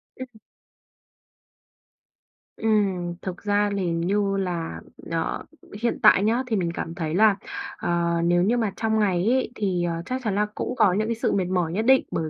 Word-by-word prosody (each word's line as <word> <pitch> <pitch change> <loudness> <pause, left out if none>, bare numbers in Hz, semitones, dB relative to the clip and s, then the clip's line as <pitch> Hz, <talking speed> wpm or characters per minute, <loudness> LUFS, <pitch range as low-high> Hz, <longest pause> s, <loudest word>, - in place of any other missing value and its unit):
Ừm. 260 0 -7 2.3
Ừm, 195 -6 0
thực 185 0 -6
ra 205 0 +2
thì 180 -3 -1
như 195 +4 0
là, 170 - -3 0.3
ờ, - - -2 0.4
hiện 235 - 0
tại 205 -2 +7
nhá 230 +5 +2
thì 225 - 0
mình 175 -3 0
cảm 165 -1 -5
thấy 160 -1 -3
là, 215 0 +5 0.4
ờ, 170 -1 0
nếu 175 +1 +3
như 235 +5 +2
mà 220 -4 0
trong 220 -1 0
ngày 185 -3 +1
ấy 255 -2 +1
thì, 185 -4 -1
ờ, 170 -1 -2
chắc 255 +1 -3
chắn 210 -4 -1
là 210 +1 +2
cũng 250 - -3
có 210 -7 +4
những 215 +3 0
cái 230 - -1
sự 230 - 0
mệt 190 -2 +1
mỏi 180 -3 0
nhất 215 +4 -1
định 265 +1 +5
bởi 160 -1 -2
195 Hz, 185 wpm, -24 LUFS, 175-220 Hz, 2.3 s, tại